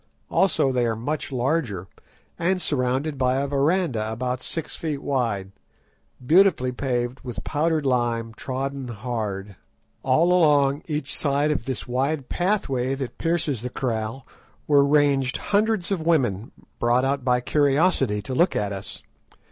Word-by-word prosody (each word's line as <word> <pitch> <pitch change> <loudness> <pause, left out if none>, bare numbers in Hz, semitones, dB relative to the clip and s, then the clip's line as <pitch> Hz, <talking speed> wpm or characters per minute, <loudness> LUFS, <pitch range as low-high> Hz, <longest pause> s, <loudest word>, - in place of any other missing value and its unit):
Also 165 -7 +3
they 125 -2 +1
are 115 - 0
much 145 +7 -3
larger, 125 - -1 0.5
and 185 +2 +1
surrounded 135 -1 -1
by 130 0 +2
a 140 - 0
verandah 140 - 0
about 125 +2 -3
six 160 +3 -4
feet 150 -4 -4
wide, 115 -8 -1 0.7
beautifully 165 -5 +4
paved 125 0 -2
with 120 -6 -7
powdered 155 0 0
lime 120 -3 0
trodden 135 +2 -4
hard. 105 -4 -4 0.4
All 160 +7 +3
along 145 -4 +4
each 150 -3 -3
side 145 +1 +1
of 140 -6 -2
this 130 -1 -4
wide 135 +3 -1
pathway 135 -10 0
that 135 -2 -6
pierces 165 -7 0
the 125 - -4
kraal 115 0 -3 0.4
were 145 -2 +5
ranged 140 -3 +2
hundreds 210 -3 0
of 190 -4 0
women, 125 - +1 0.3
brought 120 +2 +2
out 135 0 0
by 125 -1 +2
curiosity 140 - +2
to 130 - -5
look 175 +7 +2
at 100 -1 -1
us. 95 0 -7
135 Hz, 140 wpm, -24 LUFS, 120-150 Hz, 0.7 s, were